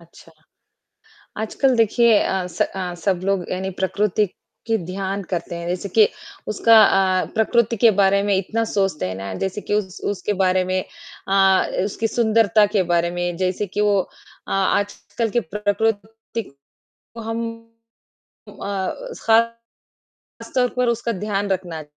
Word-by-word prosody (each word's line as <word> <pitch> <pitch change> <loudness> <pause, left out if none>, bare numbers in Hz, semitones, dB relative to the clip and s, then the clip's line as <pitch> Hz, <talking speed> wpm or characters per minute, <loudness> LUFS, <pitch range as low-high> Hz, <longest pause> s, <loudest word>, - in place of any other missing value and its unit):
अच्छा। 165 0 -18 1.1
आजकल 260 +4 +1
देखिए 230 +1 +4
अ, 190 -1 -1
स - - -3
अ, 185 -2 -4
सब 190 -3 +1
लोग 195 -3 0
यानी 190 +1 -2
प्रकृति 210 +2 +1 0.4
की 225 -1 +2
ध्यान 195 +1 -3
करते 175 -1 -3
हैं, 170 0 -5
जैसे 180 +3 -3
कि 215 +2 +5 0.4
उसका 225 +2 +4
अ, 190 -2 +3
प्रकृति 230 +1 +2
के 230 - +8
बारे 200 0 +4
में 200 -1 +2
इतना 215 +4 -1
सोचते 195 - 0
हैं 95 - -5
ना, 95 0 -6
जैसे 195 +2 -3
कि - - -4
उस 195 -3 -2
उसके 205 +1 -2
बारे 185 0 +2
में 185 +1 -1 0.5
अ, 195 -1 +4 0.2
उसकी 210 +2 -2
सुंदरता 220 -2 +3
के 195 - +4
बारे 170 0 +2
में, 175 0 -2
जैसे 185 +2 -1
कि 205 +3 -2
वो 205 -1 +3
अ, - - -15
आजकल 205 +4 -1
के 240 - +1 0.2
प्रकृति 220 +2 -2
को 140 -6 -23 0.5
हम 225 +1 -3 1.1
उम - - -13
अ, 195 -2 -3 0.3
खासतौर 230 +1 +1 1.1
पर 250 - +2
उसका 235 0 -1
ध्यान 205 0 -2
रखना 175 -4 -3
200 Hz, 150 wpm, -21 LUFS, 185-220 Hz, 1.1 s, के